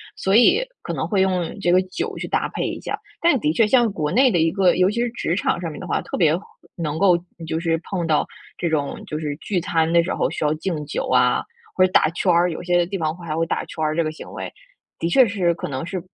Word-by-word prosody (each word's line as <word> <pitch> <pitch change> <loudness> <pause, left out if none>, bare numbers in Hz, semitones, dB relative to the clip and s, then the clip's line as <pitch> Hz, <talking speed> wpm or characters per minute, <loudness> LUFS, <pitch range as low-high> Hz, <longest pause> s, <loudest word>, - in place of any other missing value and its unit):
所 190 +1 +1
以 245 - +5 0.2
可 - - -5
能 - - -2
会 200 -3 +1
用 185 -3 0
这 175 - +2
个 180 - +6
酒 185 0 -5
去 - - -5
搭 - - 0
配 - - -3
一 - - -6
下， - - -3 0.2
但 335 -5 +4
的 155 -6 +1
确 215 +5 +3
像 240 -1 +3
国 155 -5 -2
内 255 +4 +4
的 175 - +2
一 160 0 +3
个 190 0 +3
尤 185 +1 +4
其 230 +3 -2
是 240 - +1
职 170 - -2
场 180 -2 0
上 170 - -3
面 - - -9
的 - - -7
话， - - 0
特 - - -5
别 160 -5 +4 0.4
能 155 -3 -3
够 180 -1 +4 0.3
就 160 - -1
是 165 -1 0
碰 175 -4 -3
到 155 -2 +2 0.3
这 170 - -1
种， 145 -3 -2
就 155 - -4
是 150 -2 -3
聚 185 +3 -2
餐 165 -2 0
的 170 - +6
时 180 - -2
候 - - 0
需 - - -4
要 150 - +2
敬 155 -2 -3
酒 145 - -3
啊， - - +3 0.3
或 185 - +5
者 185 - -2
打 155 - +4
圈 180 +2 +1
儿， 175 +1 +3
有 160 - -6
些 175 -1 +2
地 195 +3 -4
方 155 -2 -1
还 165 -3 -5
会 165 - +1
打 - - -2
圈 160 - -5
儿 155 0 0
这 170 - +3
个 155 - -1
行 - - -11
为， - - -6 0.5
的 165 - -1
确 255 +7 +5
是 190 -5 +1
可 165 - -6
能 135 +2 -4
是 185 +1 -4
175 Hz, 290 characters per minute, -22 LUFS, 160-190 Hz, 0.5 s, 个